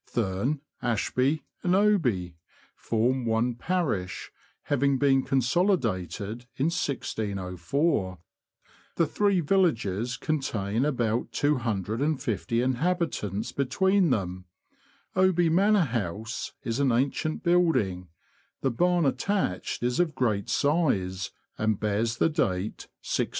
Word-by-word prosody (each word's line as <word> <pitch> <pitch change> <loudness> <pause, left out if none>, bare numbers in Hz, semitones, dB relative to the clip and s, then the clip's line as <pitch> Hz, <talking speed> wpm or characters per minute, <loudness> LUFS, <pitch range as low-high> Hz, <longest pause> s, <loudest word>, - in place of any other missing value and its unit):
Thurne, 120 +7 -1 0.2
Ashby, 130 +5 0 0.2
and 180 +1 +2
Oby 130 - +2 0.4
form 120 +3 0
one 115 +2 +1
parish, 120 - -2 0.3
having 140 -1 +1
been 135 -1 +4
consolidated 120 - 0
in 150 +5 +1
1604. 100 - -1 0.8
The 165 - +3
three 200 +3 +2
villages 125 - +1
contain 120 -6 -1
about 120 -5 0
250 120 - 0
inhabitants 130 - -1
between 190 +7 +2
them. 90 -6 -2 0.7
Oby 185 -2 +3
Manor 200 +5 +4
House 110 - -3
is 115 -1 -2
an 140 -2 +3
ancient 140 +6 0
building; 160 - +2 0.5
the 135 - +1
barn 175 +6 +2
attached 135 - -1
is 125 +4 0
of 165 -4 +1
great 110 -6 0
size, 105 - +1 0.3
and 110 -2 +1
bears 110 +3 0
the - - +3
date 105 - -1 0.2
1622. - - 0
125 Hz, 105 wpm, -27 LUFS, 105-160 Hz, 0.8 s, been